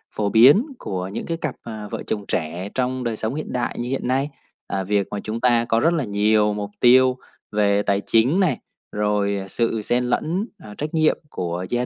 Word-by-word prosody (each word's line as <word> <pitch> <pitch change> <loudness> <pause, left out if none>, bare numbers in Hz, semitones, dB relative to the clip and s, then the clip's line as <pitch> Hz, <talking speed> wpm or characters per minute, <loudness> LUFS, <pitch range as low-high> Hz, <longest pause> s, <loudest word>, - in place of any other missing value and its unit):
phổ 105 -1 0
biến 135 - +7
của 95 -1 -4
những 95 - -5
cái 165 - -2
cặp, 155 -5 -3
ờ, 110 -2 -7
vợ - - -4
chồng 105 -2 -3
trẻ 85 +4 -3
trong 130 0 -1
đời 115 -2 -2
sống 110 +5 -2
hiện 155 - -5
đại 125 -1 -2
như 120 +1 -3
hiện 135 -1 -2
nay. 135 +3 +1 0.4
Ờ, 95 -1 -2
việc 100 +1 0
mà 105 - -3
chúng 110 +2 -4
ta 120 -2 +3
có 115 -1 +2
rất 165 +7 +3
là 160 -4 0
nhiều 105 0 +2
mục 105 0 -4
tiêu 130 +1 +5 0.3
về 105 -1 +2
tài 100 -1 +1
chính 125 +11 +3
này, 165 - +2 0.3
rồi, 105 -1 0
ờ, 95 - -8
sự 115 +2 -1
xen 120 +4 +1
lẫn, 165 - 0 0.2
ờ, 105 -1 -10
trách 150 +1 -4
nhiệm 155 -1 +3
của 90 -3 -3
gia 120 0 0
115 Hz, 220 wpm, -22 LUFS, 105-130 Hz, 0.4 s, biến